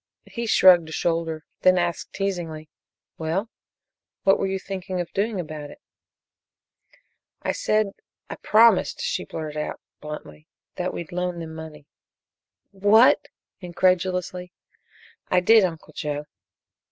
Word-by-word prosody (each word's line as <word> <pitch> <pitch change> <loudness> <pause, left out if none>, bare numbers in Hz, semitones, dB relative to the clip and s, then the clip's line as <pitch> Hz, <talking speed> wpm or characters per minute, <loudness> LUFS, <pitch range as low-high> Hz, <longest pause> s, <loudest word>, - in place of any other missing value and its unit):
He 235 -1 -5
shrugged 180 -6 +6
a - - -9
shoulder, 165 -1 -1 0.2
then 185 0 +5
asked 175 -1 -2
teasingly: 170 -6 -4 0.5
"Well 170 +8 -2 0.7
what 195 - +4
were 195 - 0
you 190 0 -1
thinking 190 -1 -5
of 175 - -4
doing 205 0 -1
about 155 -3 -6
it?" - - -13 1.6
"I - - 0
said 215 - +1 0.4
I - - -7
promised," 220 -2 +4
she - - -2
blurted 155 -2 -6
it - - -1
out - - -7 0.2
bluntly, 75 - -9 0.3
"that - - -2
we'd 170 - -7
loan 180 0 -2
them 165 -1 -7
money." 160 -2 -10 0.9
"What!" 205 +5 +5 0.3
incredulously. 180 0 0 0.8
"I 185 - +4
did, 220 +4 +6
Uncle 165 -4 -4
Joe." 150 0 -4
180 Hz, 130 wpm, -24 LUFS, 160-195 Hz, 1.6 s, shrugged